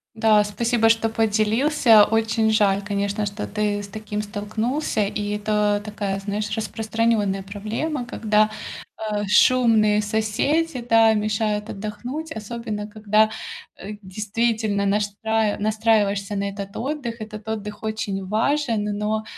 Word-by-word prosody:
Да, 215 -1 +4
спасибо, 225 +2 +1
что 225 0 +3
поделился. 225 +2 +4
Очень 225 0 +1
жаль, 200 -2 +3
конечно, 200 0 -1
что 205 +1 -4
ты 205 -1 -1
с 200 - -8
таким 210 +1 -5
столкнулся, 215 +4 -2
и 205 +1 -3
это 210 -1 +1
такая, 205 -2 -3
знаешь, 205 +1 -3
распространённая 220 -3 0
проблема, 225 +8 -4
когда, 215 -2 +2 0.6
э, 205 0 -1
шумные 215 -1 +4
соседи, 235 +9 0
да, 225 -1 +6
мешают 210 0 -1
отдохнуть, 240 +10 -6
особенно 215 -1 -5
когда, 215 0 +2 0.5
э, 205 +2 -7
действительно 215 +1 -1
наштраи 210 +2 0
настраиваешься 210 -2 +1
на 200 - -1
этот 200 0 -7
отдых. 260 -3 -4
Этот 215 0 -8
отдых 210 -1 -5
очень 215 -3 -3
важен, 230 +1 +1
но, 215 +1 -1
215 Hz, 120 wpm, -23 LUFS, 205-225 Hz, 0.6 s, да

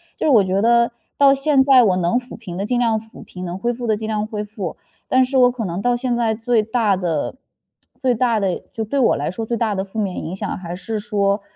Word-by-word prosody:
就 - - -1
是 - - +4
我 230 -8 +6
觉 190 +1 0
得 235 +1 +4 0.3
到 280 -1 +6
现 275 0 +3
在 265 -2 +6
我 190 -5 +2
能 180 +7 +1
抚 245 -1 -11
平 185 -6 -8
的 195 - -2
尽 245 +3 0
量 230 -2 +2
抚 220 0 -14
平， 180 - -9
能 175 0 -4
恢 240 +5 -1
复 240 0 -5
的 215 -1 +2
尽 220 - -5
量 215 -1 -1
恢 210 -2 -4
复。 205 -5 -6 0.3
但 260 0 +4
是 265 +2 -5
我 245 0 +6
可 240 -3 -4
能 175 +1 -3
到 245 +2 +2
现 245 0 -1
在 230 -2 +1
最 230 0 +1
大 220 -2 +1
的 175 - -2 0.6
最 255 -2 +2
大 235 -1 +1
的 195 -3 -1
就 225 - -3
对 245 +6 -2
我 250 - +4
来 145 +3 -2
说 225 +5 -5
最 235 +1 -2
大 225 -2 0
的 190 -1 -2
负 195 +2 -11
面 200 -4 -2
影 170 - -5
响 - - -4
还 175 -1 -6
是 215 +4 -4
说 200 -1 0
220 Hz, 280 characters per minute, -20 LUFS, 195-245 Hz, 0.6 s, 我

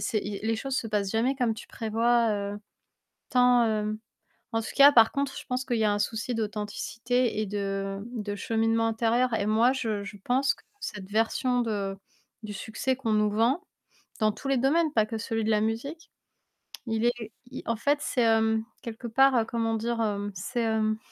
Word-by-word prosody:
C'est 215 - 0
i 205 -1 -5
les 225 0 +1
choses 270 +3 -3
se - - -1
passent 205 -3 -1
jamais 240 +5 +1
comme 240 -4 0
tu 220 - -10
prévois, 230 +1 +1
heu, 205 0 -3 0.7
tant, 250 -1 +5
hem 215 -1 -1 0.5
en 225 - +1
tout - - -6
cas 280 +1 +9
par 225 -3 +6
contre, 280 -1 -2
je - - -7
pense 255 +1 -2
qu'il 240 -3 -1
y 220 - +2
a 210 - +3
un 205 - 0
souci 230 +3 -2
d'authenticité 225 +2 -1
et 215 - -1
de 195 -1 -3 0.2
de 205 -2 -3
cheminement 225 +1 +1
intérieur 230 +2 +1
et 205 - 0
moi, 225 +4 +4
je 220 -6 -2
je 205 - -8
pense 270 +3 +2
que - - -23 0.2
cette 200 - -6
version 245 +3 +1
de 200 -3 -2 0.5
du 215 - -6
succès 225 +5 -2
qu'on 230 -5 -2
nous 210 0 +3
vend- 235 - +2 0.6
dans 215 -1 +3
tous 275 - -7
les 275 - +3
domaines, 300 +5 +2
pas 215 -4 +3
que 225 0 -4
celui 225 0 -2
de 220 - 0
la 210 -1 +3
musique- 245 +9 -3 0.8
Il 225 0 -1
est 240 - +4 0.4
i 260 - -7
en 230 - 0
fait, 285 +6 +1
c'est, 265 -4 0
hem, 220 -1 +3 0.2
quelque 230 +1 -7
part, 270 +3 +4
heu, 230 - +3
comment 225 0 -1
dire? 230 +1 -1
Hem, 205 -2 -1
c'est, 230 +7 -3
hem 220 -1 +1
225 Hz, 200 wpm, -27 LUFS, 215-245 Hz, 0.8 s, cas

